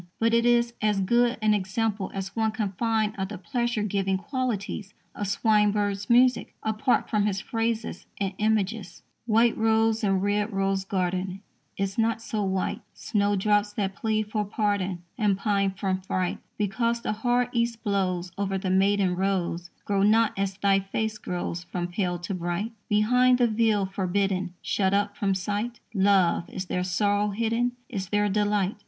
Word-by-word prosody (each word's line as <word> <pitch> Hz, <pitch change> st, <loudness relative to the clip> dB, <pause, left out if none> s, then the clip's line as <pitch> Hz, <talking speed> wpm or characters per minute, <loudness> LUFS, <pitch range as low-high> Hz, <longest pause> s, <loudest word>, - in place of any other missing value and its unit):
But 230 Hz, 0 st, +2 dB
it 235 Hz, +1 st, +4 dB
is 235 Hz, 0 st, +3 dB
as 210 Hz, -2 st, +2 dB
good 240 Hz, +5 st, +2 dB
an 215 Hz, -1 st, +4 dB
example 205 Hz, +1 st, -1 dB
as 195 Hz, -1 st, -5 dB
one 220 Hz, -1 st, +1 dB
can 215 Hz, -3 st, -2 dB
find 220 Hz, +1 st, 0 dB
of 190 Hz, -, -1 dB
the 210 Hz, -, -7 dB
pleasure 235 Hz, +4 st, -1 dB
giving 195 Hz, -2 st, 0 dB
qualities 210 Hz, -3 st, -3 dB, 0.2 s
of 205 Hz, -, -4 dB
Swinburne's 205 Hz, -1 st, +1 dB
music, 250 Hz, +1 st, +3 dB
apart 220 Hz, +4 st, +1 dB
from 210 Hz, -2 st, +1 dB
his 195 Hz, -2 st, -1 dB
phrases 225 Hz, -2 st, -3 dB
and 195 Hz, -1 st, -1 dB
images: 215 Hz, -1 st, -1 dB, 0.2 s
White 230 Hz, +1 st, +4 dB
rose 225 Hz, 0 st, +2 dB
in 195 Hz, -2 st, +2 dB
red 205 Hz, +2 st, 0 dB
rose 195 Hz, -1 st, 0 dB
garden 185 Hz, 0 st, -2 dB, 0.4 s
Is 195 Hz, +2 st, -2 dB
not 225 Hz, 0 st, +2 dB
so 220 Hz, -2 st, -3 dB
white; 190 Hz, +3 st, -1 dB
Snowdrops 205 Hz, 0 st, +1 dB
that 195 Hz, -2 st, -2 dB
plead 215 Hz, 0 st, -1 dB
for 210 Hz, -1 st, 0 dB
pardon 200 Hz, -4 st, -1 dB, 0.2 s
And 205 Hz, -3 st, +2 dB
pine 200 Hz, -1 st, +1 dB
from 190 Hz, 0 st, -1 dB
fright, 185 Hz, -1 st, -2 dB, 0.2 s
Because 230 Hz, +3 st, 0 dB
the -, -, -1 dB
hard 245 Hz, +3 st, +1 dB
East 235 Hz, -1 st, -1 dB
blows 185 Hz, -4 st, -1 dB
Over 195 Hz, -1 st, 0 dB
their 190 Hz, -1 st, -2 dB
maiden 195 Hz, -1 st, +3 dB
rows, 180 Hz, -2 st, -1 dB, 0.2 s
Grow 200 Hz, -1 st, +1 dB
not 220 Hz, +2 st, +4 dB
as 195 Hz, -1 st, -2 dB
thy 195 Hz, -1 st, +3 dB
face 215 Hz, +3 st, -3 dB
grows 175 Hz, -2 st, -4 dB
from 175 Hz, -1 st, -3 dB
pale 180 Hz, -1 st, -1 dB
to 175 Hz, +4 st, -5 dB
bright. 175 Hz, +5 st, -2 dB, 0.2 s
Behind 250 Hz, +4 st, +4 dB
the 245 Hz, -, +4 dB
veil, 220 Hz, -3 st, +2 dB
forbidden, 190 Hz, -1 st, -1 dB
Shut 195 Hz, -1 st, +1 dB
up 205 Hz, 0 st, 0 dB
from 195 Hz, -2 st, 0 dB
sight, 205 Hz, +6 st, -3 dB
Love, 190 Hz, -4 st, +3 dB
is 185 Hz, -, -5 dB
there 180 Hz, 0 st, -1 dB
sorrow 205 Hz, +3 st, +1 dB
hidden, 230 Hz, +3 st, 0 dB
Is 190 Hz, -2 st, -5 dB
there 205 Hz, 0 st, +2 dB
delight? 205 Hz, -1 st, +1 dB
205 Hz, 165 wpm, -26 LUFS, 190-220 Hz, 0.4 s, it